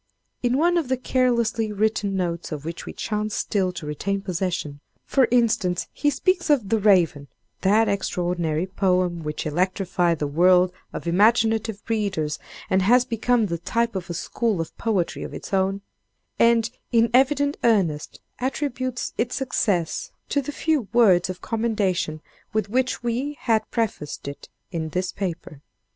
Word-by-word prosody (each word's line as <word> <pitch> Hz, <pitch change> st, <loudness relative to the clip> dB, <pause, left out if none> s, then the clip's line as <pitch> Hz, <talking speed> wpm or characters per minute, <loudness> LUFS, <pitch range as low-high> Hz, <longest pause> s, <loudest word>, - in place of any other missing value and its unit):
In 245 Hz, +1 st, +1 dB
one 345 Hz, +3 st, +3 dB
of 315 Hz, -, -3 dB
the 260 Hz, -, +1 dB
carelessly 235 Hz, -4 st, +1 dB
written 210 Hz, -1 st, 0 dB
notes 170 Hz, -2 st, -2 dB
of 150 Hz, -1 st, -5 dB
which 165 Hz, +1 st, -6 dB
we -, -, -6 dB
chance 210 Hz, -1 st, -2 dB
still 190 Hz, -4 st, 0 dB
to 170 Hz, -, -7 dB
retain 195 Hz, +7 st, -2 dB
possession, 180 Hz, -6 st, -3 dB, 0.3 s
for 265 Hz, -3 st, +3 dB
instance, 215 Hz, -7 st, +2 dB
he 295 Hz, -, +1 dB
speaks 345 Hz, +5 st, 0 dB
of 255 Hz, -10 st, +3 dB
"The 225 Hz, -, +2 dB
Raven"—that 190 Hz, +3 st, +2 dB
extraordinary 175 Hz, -4 st, -1 dB
poem 185 Hz, -2 st, 0 dB
which 150 Hz, -1 st, -4 dB
electrified 180 Hz, +1 st, +1 dB
the 150 Hz, -, -2 dB
world 180 Hz, +4 st, +4 dB, 0.2 s
of -, -, -6 dB
imaginative 220 Hz, +3 st, +2 dB
readers, 195 Hz, -9 st, -1 dB, 0.3 s
and 190 Hz, 0 st, +2 dB
has 245 Hz, +6 st, +4 dB
become 230 Hz, 0 st, +1 dB
the 170 Hz, -4 st, -3 dB
type 230 Hz, +5 st, -1 dB
of 180 Hz, -2 st, -4 dB
a 170 Hz, -, -3 dB
school 220 Hz, +3 st, -1 dB
of 165 Hz, -, -4 dB
poetry 205 Hz, -7 st, -1 dB
of -, -, -6 dB
its -, -, -8 dB
own—and, 200 Hz, +4 st, 0 dB, 0.2 s
in 230 Hz, -1 st, +3 dB
evident 285 Hz, +2 st, +3 dB
earnest, 185 Hz, -10 st, +1 dB, 0.2 s
attributes 255 Hz, -1 st, -2 dB
its 240 Hz, +1 st, 0 dB
success 205 Hz, -10 st, -1 dB, 0.2 s
to 285 Hz, -, +1 dB
the 280 Hz, -, -5 dB
few 295 Hz, -6 st, 0 dB
words 190 Hz, -7 st, +5 dB
of 185 Hz, -1 st, -6 dB
commendation 205 Hz, -9 st, -1 dB, 0.3 s
with 215 Hz, -2 st, 0 dB
which 255 Hz, 0 st, 0 dB
we 255 Hz, +5 st, -2 dB
had 225 Hz, -3 st, +1 dB
prefaced 205 Hz, -, -3 dB
it 140 Hz, -, -8 dB, 0.2 s
in 160 Hz, -3 st, -3 dB
this 180 Hz, +3 st, -2 dB
paper. 170 Hz, -6 st, -5 dB
205 Hz, 150 wpm, -24 LUFS, 175-235 Hz, 0.3 s, words